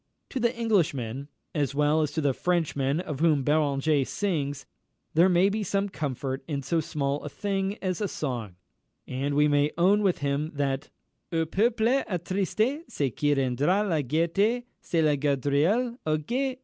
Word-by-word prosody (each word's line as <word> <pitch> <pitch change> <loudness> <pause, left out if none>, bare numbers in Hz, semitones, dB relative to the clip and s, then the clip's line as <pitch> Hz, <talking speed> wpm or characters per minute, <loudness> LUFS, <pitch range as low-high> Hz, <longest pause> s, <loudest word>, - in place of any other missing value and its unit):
To 265 - -3
the 235 0 0
Englishman, 140 - 0 0.3
as 140 -3 -1
well 150 +2 +3
as 150 - 0
to 160 - -1
the 140 -2 +2
Frenchman 155 -4 0
of 155 -6 -5
whom 155 -4 +3
Beranger 145 0 +2
sings, 145 -5 -2 0.5
there 170 +4 +5
may 180 +1 +4
be 210 +2 -1
some 200 +1 0
comfort 135 -4 -3
in 140 -3 -3
so 165 +5 +1
small 140 -2 -2
a 150 - -5
thing 195 +4 -2
as 185 +1 -1
a 205 - +1
song, 120 - -4 0.5
and 140 +3 -2
we 150 +1 +4
may 145 0 +3
own 195 +4 +4
with 195 -4 +2
him 145 +2 -2
that 140 -1 -1 0.4
"Au 165 -1 +1
peuple 220 +6 +1 0.2
attristé 200 - 0
Ce 135 -5 -1
qui 145 -1 +2
rendra 140 - +1
la 160 -5 +1
gaîté, 170 - +1 0.2
C'est 165 -2 0
la 150 -1 +3
GAUDRIOLE! 145 - +1
O 155 0 +2
gué! 255 - -2
155 Hz, 165 wpm, -27 LUFS, 140-195 Hz, 0.5 s, there